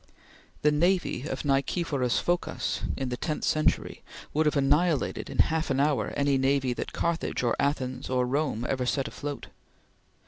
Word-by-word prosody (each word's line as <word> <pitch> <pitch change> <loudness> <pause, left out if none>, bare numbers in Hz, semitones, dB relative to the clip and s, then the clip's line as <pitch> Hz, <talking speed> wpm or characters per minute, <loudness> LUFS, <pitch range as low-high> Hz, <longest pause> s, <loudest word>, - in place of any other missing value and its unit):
The 150 - +5
navy 175 -2 +1
of - - -4
Nicephoras 140 -2 +1
Phocas 175 0 -1 0.2
in 135 -2 -2
the 125 - -3
tenth 155 +2 -3
century 155 0 +1 0.3
would 155 +1 +2
have 150 - +2
annihilated 145 +3 +1
in - - -7
half 160 0 +2
an 135 0 +1
hour 145 0 +2
any 140 -1 +2
navy 135 -1 +2
that - - -5
Carthage 170 -5 -1
or 120 - +2
Athens 130 -2 -1
or 125 -1 +2
Rome 130 -3 -1
ever 130 -2 -1
set 135 +1 0
afloat. 145 -1 -6
140 Hz, 160 wpm, -28 LUFS, 130-155 Hz, 0.3 s, The